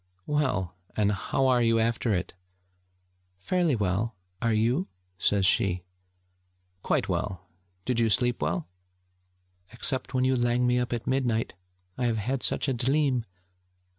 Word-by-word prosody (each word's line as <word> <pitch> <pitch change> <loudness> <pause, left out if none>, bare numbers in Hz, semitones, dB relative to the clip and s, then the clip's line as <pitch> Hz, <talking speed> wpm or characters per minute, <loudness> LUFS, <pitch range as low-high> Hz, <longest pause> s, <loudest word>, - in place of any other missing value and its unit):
'Well, 130 - 0 0.2
and 105 -1 +3
how 120 +6 0
are 125 -2 +4
you 115 -1 +3
after 115 +1 +1
it?' 90 -2 -1 1.0
'Fairly 170 - +1
well. 105 +2 -1 0.3
Are 115 -1 +2
you?' 120 - +1 0.3
says 100 0 +2
she. 90 -1 +2 1.0
'Quite - - 0
well. 95 -2 -3 0.4
Did 125 -2 0
you 115 -1 +3
sleep 120 +3 +2
well?' 85 +3 -1 1.0
'Except 130 +2 -1
when 130 - +2
you 130 0 +3
lang 120 0 +2
me 125 0 +3
up 125 0 -2
at 120 -2 -3
midnight. 125 -4 0 0.5
I 125 - +1
have 115 -1 0
had 125 +5 -2
such - - +2
a 135 - +1
dleam 130 0 +1
120 Hz, 140 wpm, -27 LUFS, 105-130 Hz, 1.0 s, are